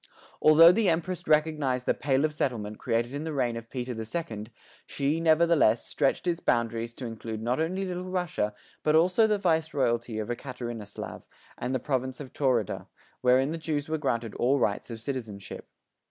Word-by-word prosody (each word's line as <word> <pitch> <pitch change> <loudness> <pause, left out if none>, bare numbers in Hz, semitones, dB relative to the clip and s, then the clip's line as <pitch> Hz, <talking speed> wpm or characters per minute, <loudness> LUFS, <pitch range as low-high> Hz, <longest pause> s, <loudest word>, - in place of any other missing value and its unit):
Although 160 +2 +8
the 210 +1 +2
Empress 170 +1 -2
recognized 150 -5 +2
the - - +3
"Pale 140 0 +1
of 155 - -1
Settlement" 110 -7 -2
created 120 +1 -1
in 145 +2 -3
the 160 -1 -4
reign 125 -4 0
of 115 0 -8
Peter 125 -1 -4
the 110 -1 -5
Second, 110 -5 -5 0.4
she, 145 +3 0
nevertheless, 160 -7 +4
stretched 135 +4 0
its 175 -1 0
boundaries 115 -2 0
to 130 - -6
include 115 -1 -5
not 120 +4 -1
only 185 +4 -1
Little 180 0 -4
Russia 175 - -1 0.3
but 155 0 +2
also 180 +7 +5
the 210 -1 +2
Vice 160 -5 0
Royalty 120 -4 0
of 110 +1 -3
Ekaterinoslav 120 -5 -6 0.3
and 125 +2 -3
the - - +1
province 130 0 -2
of 140 -3 -9
Taurida, 125 -7 0 0.3
wherein 130 +3 +4
the 165 - -4
Jews 150 -2 -2
were 160 0 -1
granted 115 -5 -1
all 130 +4 +2
rights 105 -4 0
of 115 -1 -6
citizenship. 110 -6 -6
130 Hz, 180 wpm, -28 LUFS, 115-160 Hz, 0.4 s, Although